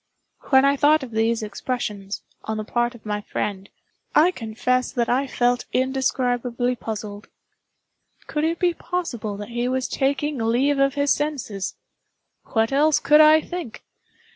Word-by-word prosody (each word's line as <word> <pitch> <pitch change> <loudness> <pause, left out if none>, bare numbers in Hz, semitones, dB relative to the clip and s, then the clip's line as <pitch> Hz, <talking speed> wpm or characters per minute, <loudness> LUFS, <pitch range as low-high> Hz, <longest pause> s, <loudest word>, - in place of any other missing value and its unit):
When 265 0 +6
I 280 0 +4
thought 300 +1 +4
of 250 - -8
these 225 +1 +1
expressions, 210 -2 -4 0.2
on 220 0 -3
the 215 - -3
part 240 +2 -1
of 225 - -16
my 210 0 -2
friend, 200 -1 -4 0.5
I 330 +4 +6
confess 250 -1 -1
that 240 -3 -1
I 265 +3 +1
felt 245 -1 +1
indescribably 250 -2 0
puzzled. 210 -2 -6 1.0
Could 300 -1 -2
it 330 +1 0
be 350 0 +2
possible 275 - -4
that 205 +1 -7
he 240 +1 -2
was 260 0 -1
taking 280 +1 -1
leave 250 +5 +1
of 275 0 +2
his 285 0 +2
senses? 275 -10 -3 0.7
What 225 +1 0
else 295 +2 +3
could 300 +1 +6
I 310 +1 +7
think? 345 -11 -7
250 Hz, 150 wpm, -23 LUFS, 225-285 Hz, 1.0 s, I